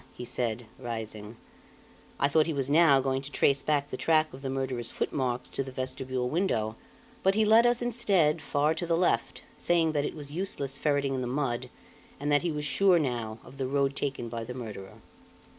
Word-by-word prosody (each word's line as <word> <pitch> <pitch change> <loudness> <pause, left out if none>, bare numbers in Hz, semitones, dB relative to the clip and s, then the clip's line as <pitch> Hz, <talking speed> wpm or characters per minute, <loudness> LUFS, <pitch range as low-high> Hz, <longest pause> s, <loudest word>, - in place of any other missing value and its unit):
he 125 - -7
said, 120 -1 -2
rising. 110 -2 -6 0.8
I 140 - +4
thought 155 +2 +3
he 160 - -2
was 135 0 -1
now 150 -4 +6
going 135 0 -1
to 140 - -8
trace 140 -1 +3
back 145 -1 0
the 130 - -3
track 155 +1 +2
of 130 - -10
the 135 - -3
murderer's 130 -3 -2
footmarks 125 -2 -2
to 135 - -2
the 135 - -8
vestibule 130 -1 -3
window; 120 - 0 0.5
but 190 +1 +3
he 220 0 +3
led 225 +3 +6
us 240 0 +2
instead, 195 -10 +2
far 150 0 +1
to 170 +2 -4
the 165 0 +2
left, 170 -10 0 0.2
saying 165 -2 +2
that 145 -2 0
it - - -3
was 145 -2 -8
useless 145 -6 -2
ferreting 145 -2 +1
in 130 - -2
the 125 - -2
mud, 125 -2 -2 0.5
and 145 +1 -1
that 145 - +4
he 170 - -1
was 150 -1 -3
sure, 190 +4 +4
now, 120 -7 -2
of 135 +2 -14
the 130 - -1
road 140 0 +1
taken 135 -4 -3
by 115 0 -5
the 125 +2 -7
murderer. 105 -6 -8
140 Hz, 205 wpm, -28 LUFS, 125-155 Hz, 0.8 s, now